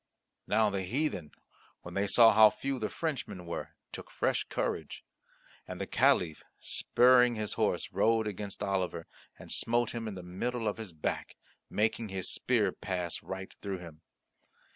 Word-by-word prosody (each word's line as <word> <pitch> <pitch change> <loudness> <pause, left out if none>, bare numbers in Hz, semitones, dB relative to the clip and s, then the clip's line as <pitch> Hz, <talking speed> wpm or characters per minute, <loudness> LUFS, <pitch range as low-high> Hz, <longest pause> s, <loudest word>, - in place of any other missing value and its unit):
Now 110 0 +3
the 100 -1 -1
heathen, 100 - -2 0.5
when 85 - -9
they 100 +2 0
saw 115 +2 +7
how 110 -1 +8
few 135 +3 -3
the 110 - -2
Frenchmen 135 - -4
were, 85 - -6 0.2
took - - -9
fresh - - 0
courage. - - -3 0.6
And 90 -1 -7
the 100 - -2
Caliph, 105 - +2
spurring 125 -1 +4
his 110 -2 -2
horse, - - 0
rode 115 0 +2
against 105 0 -4
Oliver 95 -4 -1 0.3
and - - -8
smote 120 0 +1
him 115 -1 -4
in 105 - -5
the 90 - -8
middle 110 +6 -3
of 105 - -1
his 110 -5 -6
back, 80 -2 -4 0.3
making 110 +1 0
his 95 -1 -2
spear - - +1
pass 90 -3 -3
right 95 0 -7
through 100 -2 -3
him. 85 -3 -11
105 Hz, 160 wpm, -31 LUFS, 90-115 Hz, 0.6 s, how